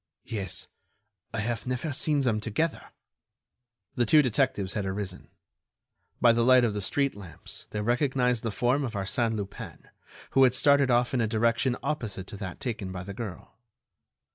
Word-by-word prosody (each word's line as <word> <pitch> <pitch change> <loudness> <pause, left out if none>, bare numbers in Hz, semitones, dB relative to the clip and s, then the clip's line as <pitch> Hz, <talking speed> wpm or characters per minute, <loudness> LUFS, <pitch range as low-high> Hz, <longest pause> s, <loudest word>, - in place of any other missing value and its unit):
"Yes, 100 -5 -5 0.7
I 110 - -2
have 115 +2 -3
never 130 +4 -2
seen 145 +1 +1
them 115 -5 +1
together." 115 +10 -2 1.1
The 120 -2 +1
two 150 +3 +6
detectives 125 -6 0
had 105 - -1
arisen. 95 -1 -4 0.9
By 120 - +6
the 115 0 +2
light 125 0 +6
of 110 - 0
the 105 - -3
street 140 +8 0
lamps 95 -6 -10
they 105 - -3
recognized 125 +1 +1
the 115 - -2
form 125 +6 +1
of 120 -4 -3
Arsène 110 +3 0
Lupin, 100 -2 -7 0.4
who 135 - +5
had 130 -1 +5
started 140 -1 +4
off 120 +1 +2
in 125 - +2
a 110 - +1
direction 115 +3 +1
opposite 110 -11 -3
to 100 - -9
that 95 -3 -6
taken 105 -6 -4
by 90 0 -5
the 100 +2 -7
girl. 110 0 -8
115 Hz, 165 wpm, -28 LUFS, 105-130 Hz, 1.1 s, two